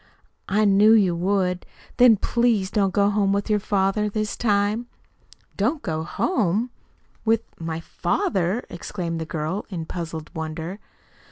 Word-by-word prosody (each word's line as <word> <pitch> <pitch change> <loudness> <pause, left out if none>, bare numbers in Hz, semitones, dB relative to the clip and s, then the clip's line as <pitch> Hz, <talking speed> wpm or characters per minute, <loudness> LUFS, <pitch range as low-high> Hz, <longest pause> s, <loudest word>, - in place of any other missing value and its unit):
"I 210 +2 +3
knew 205 +2 +6
you 195 -6 +4
would. 180 0 0 0.3
Then 245 -3 +7
please 225 -3 +1
don't 195 -3 +2
go 200 +2 +3
home 200 -1 +2
with 200 +2 -1
your 210 - +3
father 200 +1 +1
this 215 0 -2
time." 210 +1 +1 0.7
"Don't 300 -4 0
go 160 -6 -2
home 220 - 0 0.5
with 225 0 +3 0.2
my 165 0 -4
father!" 185 +5 -1
exclaimed 170 -2 -4
the 160 - -4
girl, 160 +5 -3
in 170 -5 -4
puzzled 165 -2 -6
wonder. 160 +3 -5
195 Hz, 140 wpm, -24 LUFS, 170-215 Hz, 0.7 s, Then